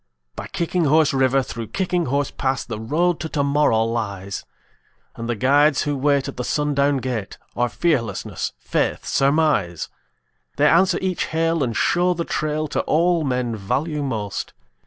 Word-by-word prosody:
By - - -6
Kicking 175 0 -1
Horse 150 0 +4
River, 135 0 +3
through 115 -3 -6
Kicking 180 - -1
Horse 140 +2 0
Pass, 135 0 -1
The 110 -3 -5
Road 160 +9 +1
to 160 - -4
Tomorrow 140 -6 +2
lies; 100 -4 -3 0.7
And 115 +1 -6
the 120 - 0
guides 145 +6 +3
who 145 -1 -1
wait 140 0 +1
at - - -7
the 125 - -2
sundown 145 0 +1
gate 120 -6 -4 0.2
Are 120 0 +1
Fearlessness, 115 - -1
Faith, - - -1
Surmise. 135 - +1 0.7
They 145 +3 +4
answer 175 +3 +4
each 185 -2 0
hail 165 -1 0
and 120 -3 -2
show 180 +5 +2
the 170 0 -2
trail 155 0 -1
To - - -1
all 170 +1 +2
men 125 -4 -1
value 145 +10 -2
most. 110 -7 -3
140 Hz, 155 wpm, -22 LUFS, 120-160 Hz, 0.7 s, Horse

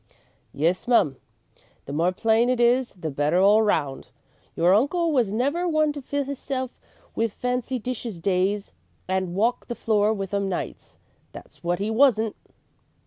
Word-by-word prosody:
"Yes, 170 +8 0
mum. 155 - +3 0.7
The 140 - -7
more 170 +4 +2
plain 225 +5 +2
it 255 -1 +1
is 245 +1 +3
the 165 -5 -5
better 145 +5 +1
all 205 +3 +6
around. 155 -11 0 0.5
Your 175 +2 +4
uncle 320 - +2
was 245 -9 +2
never 285 +11 0
one 310 -2 +2
to 290 - -7
fill 285 +2 -2
hisself 265 -2 -5 0.3
with 225 -2 -1
fancy 250 +1 -2
dishes 235 -5 -5
days 195 +3 0 0.3
and 185 -1 -1
walk 230 +5 0
the 240 - -4
floor 215 -2 +2
with 195 -3 -4
'em 200 -1 0
nights, 180 - -6 0.4
that's - - -13
wot 175 +1 0
'e 205 +2 -1
wasn't." 225 -3 +3
220 Hz, 155 wpm, -24 LUFS, 185-255 Hz, 0.7 s, all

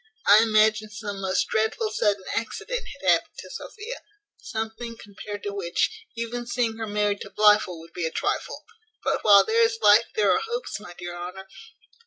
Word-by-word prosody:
I 210 +2 +8
imagined 215 -1 +3
some 205 -2 -6
most 190 -1 0
dreadful 220 0 0
sudden 205 -2 +1
accident 485 - -3 0.2
had - - -4
happened - - +2
to - - -9
Sophia; 445 +4 -8 0.4
something, 225 +1 -5
compared 205 0 -9
to 205 - -4
which, 175 -4 -2
even 235 +1 -4
seeing 235 -2 -1
her 225 -1 -4
married 205 -1 0
to - - -7
Blifil 210 -3 +3
would 165 +1 -14
be 170 -2 -2
a - - -5
trifle; - - -2 0.4
but - - 0
while 205 -2 +7
there 455 +1 +2
is 455 0 +2
life 210 +3 +6
there 210 -2 +3
are - - +3
hopes, 475 - -4
my 175 -4 -11
dear 175 0 -6
Honour. 180 +2 -7
215 Hz, 180 wpm, -25 LUFS, 200-230 Hz, 0.4 s, I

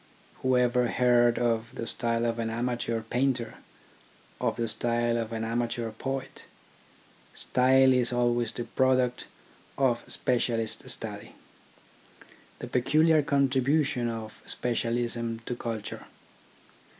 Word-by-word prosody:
Whoever 125 -1 +2
heard 120 -1 +3
of 115 0 -1
the 115 - -4
style 115 0 -1
of 115 0 -1
an 115 -1 -1
amateur 120 0 -2
painter, 120 +1 -1 0.8
of - - 0
the 115 - -1
style 120 +1 +1
of 115 -1 -2
an 110 -1 -3
amateur 115 0 -2
poet? 135 +4 -5 0.9
Style 130 +1 +4
is 125 -1 +2
always 120 -1 +1
the 120 - -5
product 130 0 +1 0.5
of 125 -4 +1
specialist 115 -3 -1
study, - - -4 1.2
the - - -7
peculiar 155 +5 +3
contribution 140 -2 +1
of 110 -1 -7
specialism 115 -1 -2
to 125 - -3
culture. 115 -3 -5
120 Hz, 110 wpm, -28 LUFS, 115-130 Hz, 1.2 s, Style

